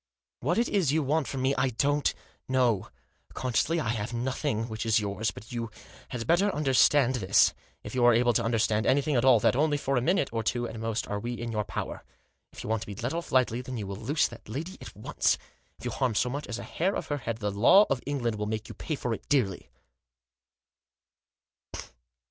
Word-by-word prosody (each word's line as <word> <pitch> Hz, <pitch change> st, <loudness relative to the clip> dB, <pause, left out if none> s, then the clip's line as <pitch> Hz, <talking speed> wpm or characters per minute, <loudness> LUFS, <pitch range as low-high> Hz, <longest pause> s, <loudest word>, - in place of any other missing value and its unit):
" -, -, -66 dB
What 165 Hz, -, 0 dB
it 235 Hz, -, +2 dB
is 185 Hz, -9 st, +1 dB
you 155 Hz, +1 st, +2 dB
want 145 Hz, +1 st, 0 dB
from 130 Hz, -2 st, -3 dB
me 135 Hz, +1 st, +3 dB
I 130 Hz, -, +2 dB
don't 145 Hz, +4 st, +1 dB, 0.4 s
know; 125 Hz, -6 st, +1 dB, 0.5 s
consciously 130 Hz, +6 st, 0 dB
I 115 Hz, -, -2 dB
have 115 Hz, 0 st, -2 dB
nothing 125 Hz, -1 st, -1 dB
which 110 Hz, -2 st, -4 dB
is 110 Hz, -1 st, +3 dB
yours. 105 Hz, +1 st, -1 dB
But 110 Hz, +4 st, -10 dB
you 115 Hz, -2 st, -3 dB, 0.4 s
had 115 Hz, -2 st, -4 dB
better 175 Hz, +5 st, +3 dB
understand 135 Hz, -2 st, +4 dB
this, 100 Hz, -3 st, +4 dB, 0.3 s
if -, -, -8 dB
you 125 Hz, -1 st, +1 dB
are 120 Hz, -, +7 dB
able 120 Hz, +1 st, +3 dB
to -, -, +1 dB
under 115 Hz, 0 st, +1 dB
stand 110 Hz, 0 st, +1 dB
anything 140 Hz, +2 st, +2 dB
at 120 Hz, -, +2 dB
all, 130 Hz, -3 st, +6 dB
that -, -, +3 dB
only 150 Hz, +2 st, +2 dB
for 135 Hz, -1 st, -1 dB
a -, -, +2 dB
minute 165 Hz, +2 st, +1 dB
or 115 Hz, 0 st, -1 dB
two 120 Hz, +2 st, -1 dB
at 115 Hz, -, -7 dB
most 115 Hz, 0 st, -2 dB
are 105 Hz, -, -2 dB
we 120 Hz, +3 st, -4 dB
in 120 Hz, -1 st, -5 dB
your 105 Hz, -1 st, -1 dB
power. 95 Hz, -, -5 dB, 0.5 s
If -, -, -9 dB
you -, -, -6 dB
want 110 Hz, -1 st, 0 dB
to -, -, -7 dB
be 100 Hz, -, -6 dB
let 120 Hz, +7 st, -3 dB
off 170 Hz, +1 st, -4 dB
lightly 125 Hz, -1 st, +2 dB
you 120 Hz, -5 st, -4 dB
will 100 Hz, 0 st, -5 dB
loose 130 Hz, +9 st, +1 dB
that -, -, -13 dB
lady 160 Hz, -, -5 dB
at -, -, -10 dB
once; -, -, +1 dB, 0.4 s
if -, -, -12 dB
you -, -, -1 dB
harm 125 Hz, -5 st, 0 dB
so 125 Hz, +3 st, +1 dB
much 145 Hz, +2 st, -4 dB
as 120 Hz, -, -4 dB
a -, -, -6 dB
hair 185 Hz, +4 st, -1 dB
of -, -, -3 dB
her 145 Hz, -, 0 dB
head 115 Hz, -3 st, -4 dB
the 105 Hz, -3 st, -2 dB
law 120 Hz, -, +6 dB
of 135 Hz, -2 st, -1 dB
England 120 Hz, -6 st, -1 dB
will 105 Hz, -, -2 dB
make 110 Hz, 0 st, -4 dB
you -, -, -7 dB
pay 155 Hz, -, -4 dB
for 120 Hz, -4 st, -2 dB
it -, -, -8 dB
dearly." 115 Hz, -10 st, 0 dB
120 Hz, 230 wpm, -28 LUFS, 110-140 Hz, 0.5 s, are